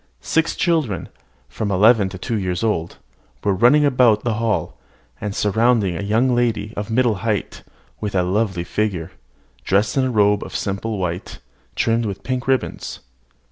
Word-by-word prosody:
Six 160 Hz, 0 st, +1 dB
children, 155 Hz, -, 0 dB, 0.4 s
from 105 Hz, -, -4 dB
eleven 100 Hz, +1 st, +4 dB
to 95 Hz, -, -8 dB
two 115 Hz, +5 st, -3 dB
years 90 Hz, -1 st, -2 dB
old, 90 Hz, -7 st, -1 dB, 0.5 s
were 100 Hz, -, +2 dB
running 125 Hz, +9 st, +5 dB
about 125 Hz, -6 st, +4 dB
the 120 Hz, -, 0 dB
hall, 115 Hz, -2 st, -1 dB, 0.5 s
and 105 Hz, -2 st, -4 dB
surrounding 110 Hz, -3 st, +2 dB
a 105 Hz, +5 st, 0 dB
lady 120 Hz, -4 st, +1 dB
of 105 Hz, +1 st, -4 dB
middle 115 Hz, -2 st, +2 dB
height, 110 Hz, -2 st, -2 dB, 0.4 s
with 105 Hz, -2 st, -4 dB
a 90 Hz, -, +3 dB
lovely 95 Hz, -1 st, 0 dB
figure, 95 Hz, -3 st, -2 dB, 0.5 s
dressed 100 Hz, +5 st, +1 dB
in 130 Hz, -, +3 dB
a -, -, 0 dB
robe 105 Hz, -3 st, +3 dB
of -, -, -8 dB
simple 100 Hz, +2 st, -2 dB
white, 90 Hz, -1 st, -4 dB, 0.4 s
trimmed 115 Hz, 0 st, +1 dB
with 100 Hz, -2 st, -6 dB
pink 130 Hz, 0 st, -3 dB
ribbons. 135 Hz, -1 st, -2 dB
105 Hz, 155 wpm, -21 LUFS, 100-120 Hz, 0.5 s, running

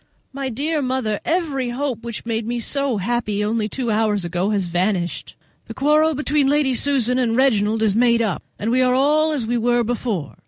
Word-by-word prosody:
My 270 Hz, -1 st, -3 dB
dear 295 Hz, +6 st, -2 dB
mother, 255 Hz, -5 st, -1 dB
every 300 Hz, -7 st, -1 dB
hope 250 Hz, -2 st, -3 dB
which 235 Hz, -1 st, -6 dB
made 225 Hz, -1 st, -2 dB
me 240 Hz, +1 st, -2 dB
so 275 Hz, 0 st, 0 dB
happy 210 Hz, 0 st, -1 dB
only 215 Hz, 0 st, -1 dB
two 240 Hz, 0 st, -2 dB
hours 210 Hz, -3 st, +1 dB
ago 175 Hz, +3 st, -1 dB
has 200 Hz, -3 st, 0 dB
vanished. 175 Hz, +1 st, -2 dB, 0.3 s
The -, -, -8 dB
quarrel 305 Hz, +3 st, +3 dB
between 290 Hz, 0 st, +1 dB
Lady 285 Hz, -2 st, +2 dB
Susan 250 Hz, -1 st, +1 dB
and 235 Hz, -2 st, +1 dB
Reginald 220 Hz, -4 st, +2 dB
is 205 Hz, -2 st, +2 dB
made 235 Hz, 0 st, +3 dB
up, 215 Hz, -5 st, -1 dB, 0.2 s
and 220 Hz, +3 st, -2 dB
we 255 Hz, +1 st, +3 dB
are 250 Hz, 0 st, +3 dB
all 305 Hz, +4 st, +3 dB
as 280 Hz, -7 st, -1 dB
we 240 Hz, +1 st, 0 dB
were 240 Hz, +1 st, +2 dB
before. 225 Hz, -7 st, -3 dB
240 Hz, 195 wpm, -21 LUFS, 215-275 Hz, 0.3 s, quarrel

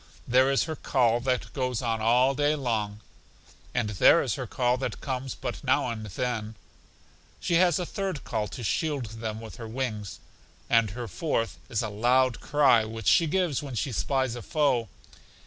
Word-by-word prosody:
There 130 Hz, +2 st, +4 dB
is 135 Hz, -, +2 dB
her 160 Hz, -1 st, -4 dB
call 120 Hz, -5 st, +2 dB
that 125 Hz, 0 st, -2 dB
goes 125 Hz, -4 st, -1 dB
on 115 Hz, -2 st, -1 dB
all 125 Hz, +4 st, +4 dB
day 145 Hz, +2 st, +2 dB
long; 110 Hz, -6 st, -2 dB, 0.7 s
and 120 Hz, -4 st, -1 dB
there 95 Hz, -, +5 dB
is -, -, -1 dB
her -, -, -4 dB
call 125 Hz, -1 st, +1 dB
that 130 Hz, -, -4 dB
comes 130 Hz, -1 st, -4 dB
but -, -, -5 dB
now -, -, +2 dB
and 110 Hz, -2 st, -6 dB
then; 110 Hz, +1 st, -3 dB, 0.8 s
she -, -, -2 dB
has 175 Hz, -3 st, +4 dB
a 180 Hz, -, -2 dB
third 190 Hz, -5 st, -4 dB
call 110 Hz, -2 st, -2 dB
to 120 Hz, +5 st, -8 dB
shield 145 Hz, +2 st, -1 dB, 0.2 s
them 110 Hz, -1 st, -3 dB
with 110 Hz, 0 st, -10 dB
her 115 Hz, -2 st, -7 dB
wings; 110 Hz, -5 st, -4 dB, 0.5 s
and 115 Hz, -2 st, +4 dB
her 120 Hz, +3 st, -6 dB
fourth 115 Hz, -, -2 dB
is 115 Hz, 0 st, -1 dB
a 110 Hz, -, -2 dB
loud 120 Hz, +4 st, +2 dB
cry, 145 Hz, -6 st, +4 dB
which 110 Hz, 0 st, -7 dB
she 165 Hz, -, +5 dB
gives 175 Hz, -4 st, 0 dB
when 140 Hz, -4 st, -6 dB
she 130 Hz, +4 st, -1 dB
spies 130 Hz, +2 st, 0 dB
a 120 Hz, -, -6 dB
foe. 125 Hz, -4 st, +1 dB
125 Hz, 180 wpm, -27 LUFS, 110-135 Hz, 0.8 s, there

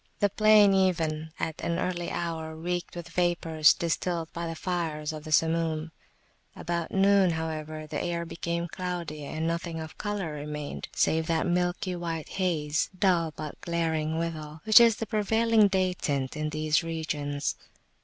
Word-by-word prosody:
The 205 Hz, -, +3 dB
plain 215 Hz, -1 st, +6 dB
even 165 Hz, -5 st, +1 dB
at 160 Hz, -, -3 dB
an 170 Hz, 0 st, -1 dB
early 175 Hz, -1 st, -2 dB
hour 160 Hz, -2 st, -3 dB
reeked 175 Hz, +2 st, -3 dB
with 170 Hz, -1 st, -7 dB
vapours 165 Hz, -3 st, +3 dB
distilled 170 Hz, 0 st, -2 dB
by 170 Hz, 0 st, -3 dB
the 165 Hz, -, -4 dB
fires 160 Hz, -3 st, -2 dB
of 155 Hz, -1 st, -8 dB
the 155 Hz, -, -7 dB
Samum: 160 Hz, 0 st, +1 dB, 0.6 s
about 170 Hz, 0 st, -3 dB
noon, 195 Hz, -1 st, +4 dB
however, 155 Hz, -1 st, -4 dB
the 150 Hz, -1 st, -4 dB
air 170 Hz, -1 st, -2 dB
became 170 Hz, +1 st, -3 dB
cloudy, 175 Hz, -4 st, -4 dB
and 155 Hz, +3 st, -3 dB
nothing 170 Hz, 0 st, -2 dB
of 160 Hz, -1 st, -8 dB
colour 205 Hz, -6 st, -2 dB
remained, 150 Hz, 0 st, -5 dB
save 160 Hz, 0 st, +2 dB
that 165 Hz, -1 st, +1 dB
milky 180 Hz, +1 st, 0 dB
white 165 Hz, -3 st, -4 dB
haze, 155 Hz, -5 st, 0 dB
dull, 175 Hz, -4 st, +2 dB
but 155 Hz, -1 st, -7 dB
glaring 160 Hz, -2 st, -1 dB
withal, 160 Hz, -2 st, -4 dB
which 220 Hz, +1 st, +8 dB
is 230 Hz, -2 st, +6 dB
the 225 Hz, -, -4 dB
prevailing 220 Hz, 0 st, +3 dB
day 185 Hz, -1 st, +1 dB
tint 140 Hz, -6 st, -2 dB
in 155 Hz, 0 st, -2 dB
these 155 Hz, 0 st, +1 dB
regions. 150 Hz, -3 st, -2 dB
165 Hz, 155 wpm, -28 LUFS, 155-180 Hz, 0.6 s, which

